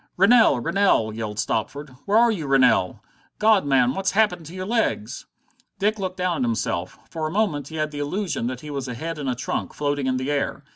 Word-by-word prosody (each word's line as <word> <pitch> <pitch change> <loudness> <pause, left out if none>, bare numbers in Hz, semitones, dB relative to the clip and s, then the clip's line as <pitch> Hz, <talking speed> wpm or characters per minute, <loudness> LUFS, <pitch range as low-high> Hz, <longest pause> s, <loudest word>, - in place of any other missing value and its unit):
"Rennell! 200 - +5
Rennell!" 165 - +2
yelled 110 -2 -5
Stopford. 140 +7 -2 0.2
"Where 205 +2 +3
are 235 0 +5
you, 165 -9 -4
Rennell? 130 -9 +3 0.3
God, 215 -6 +3
man, 130 -2 +3
what's 190 +4 -1
happened 185 -6 +1
to 170 - -10
your 185 0 -4
legs?" 220 - -2 0.5
Dick 210 +2 0
looked 185 -1 -4
down 180 -2 0
at - - -3
himself. 90 -5 -2
For 160 -1 -3
a - - -5
moment 170 -9 0
he 160 - -9
had 155 -1 -2
the 145 - -6
illusion 150 - -2
that 130 0 -5
he 150 - -8
was 135 -2 -4
a 125 - -5
head 165 +5 -5
and 140 -3 -3
a 125 - -1
trunk, 125 - -4
floating 145 -2 -1
in 130 0 +1
the 130 +3 -2
air. 145 -1 -2
150 Hz, 220 wpm, -23 LUFS, 130-190 Hz, 0.5 s, Rennell